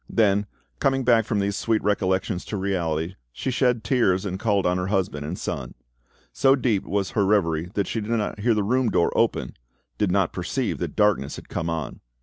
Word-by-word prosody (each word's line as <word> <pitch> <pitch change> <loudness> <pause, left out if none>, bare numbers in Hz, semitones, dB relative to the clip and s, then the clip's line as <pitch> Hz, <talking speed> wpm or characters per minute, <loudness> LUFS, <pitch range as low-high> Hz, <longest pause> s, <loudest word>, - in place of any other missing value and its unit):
Then, 105 -2 +2 0.3
coming 135 -1 +1
back 115 -3 +4
from 105 - -1
these 100 0 0
sweet 110 +2 0
recollections 95 -2 0
to 105 - -4
reality, 90 -3 -2
she 130 - -3
shed 125 -3 +1
tears, 105 -8 +2
and 95 -1 -3
called 100 -3 +1
on 90 +1 +2
her 90 - -2
husband 90 -7 -1
and 90 +4 -4
son. - - -5 0.6
So 135 0 +4
deep 115 -7 0
was 100 -1 -1
her 105 - +1
reverie 90 -5 +1
that 100 - +1
she 115 - -3
did 105 - -6
not 110 -2 -1
hear 115 +2 +2
the 105 - +1
room 125 +3 +2
door 85 - +1
open, - - +1 0.5
did 105 -3 +2
not 95 -2 +1
perceive 120 +8 -2
that - - -4
darkness 105 -10 +2
had - - -11
come 85 - -2
on. 80 -2 -4
100 Hz, 200 wpm, -24 LUFS, 90-115 Hz, 0.6 s, back